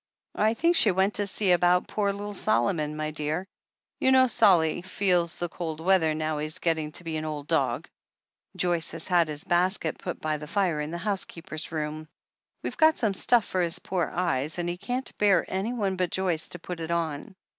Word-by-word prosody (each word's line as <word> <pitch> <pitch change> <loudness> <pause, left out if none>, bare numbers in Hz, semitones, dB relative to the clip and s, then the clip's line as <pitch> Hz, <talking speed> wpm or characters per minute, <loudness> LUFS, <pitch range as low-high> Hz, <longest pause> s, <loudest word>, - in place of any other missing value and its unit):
"I 220 +2 +3
think 335 +7 +2
she 225 - +6
went 190 +2 +2
to 205 - 0
see 200 -1 0
about 180 0 +3
poor 205 -2 0
little 205 +1 -6
Solomon, 150 - +1
my 155 0 -2
dear. 155 +4 -3 0.5
You 260 - +3
know, 260 0 +6
Solly 175 -9 +4
feels 180 -2 +1
the 175 - -2
cold 160 -2 -5
weather 165 -3 +3
now 155 -1 -2
he's 155 +1 -2
getting 160 -3 -1
to - - -3
be 160 -2 -3
an 155 - -4
old 150 -2 -5
dog. - - 0 0.7
Joyce 175 -2 +1
has - - -5
had 175 -3 +3
his 150 0 -5
basket 175 -2 0
put - - -5
by 155 -1 -1
the 150 0 -9
fire 175 -5 0
in 150 - -4
the 170 - -4
housekeeper's 175 -5 -4
room. 155 0 -4 0.6
We've - - -4
got 315 -1 +5
some 220 -5 +1
stuff 230 +3 +3
for 185 - -1
his 170 -1 0
poor 180 -4 -2
eyes, 160 -4 -1
and 175 0 -2
he 175 - -2
can't 245 +7 -4
bear 200 -4 +4
anyone 195 0 -2
but 180 -1 0
Joyce 180 -4 -1
to - - -6
put 175 0 -7
it 165 0 -5
on. 170 +1 -2
175 Hz, 200 wpm, -27 LUFS, 155-195 Hz, 0.7 s, she